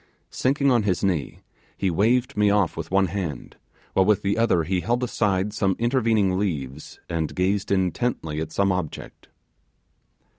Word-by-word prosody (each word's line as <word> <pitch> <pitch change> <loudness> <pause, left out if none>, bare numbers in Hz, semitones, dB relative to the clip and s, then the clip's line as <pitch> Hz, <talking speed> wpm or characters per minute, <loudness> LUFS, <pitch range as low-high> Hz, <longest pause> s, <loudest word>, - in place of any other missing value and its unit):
Sinking 140 +1 +1
on 120 -2 +4
his 100 -3 -1
knee, 90 -7 -1 0.4
he 95 -2 0
waved 120 +8 +1
me 105 -1 +3
off 100 -4 +2
with 80 -1 -6
one 95 +1 +3
hand, 90 -4 -5 0.4
while 95 - +4
with 105 0 +2
the 100 +1 +1
other 115 -7 +2
he 90 +3 -1
held 120 +4 0
aside 105 -4 0
some 95 -3 +1
intervening 115 -6 +1
leaves, 75 -7 -4
and 80 -2 -3
gazed 95 +2 0
intently 95 -4 -1
at 80 - -5
some 100 -1 +1
object. 90 -5 -5
95 Hz, 155 wpm, -24 LUFS, 90-110 Hz, 0.4 s, on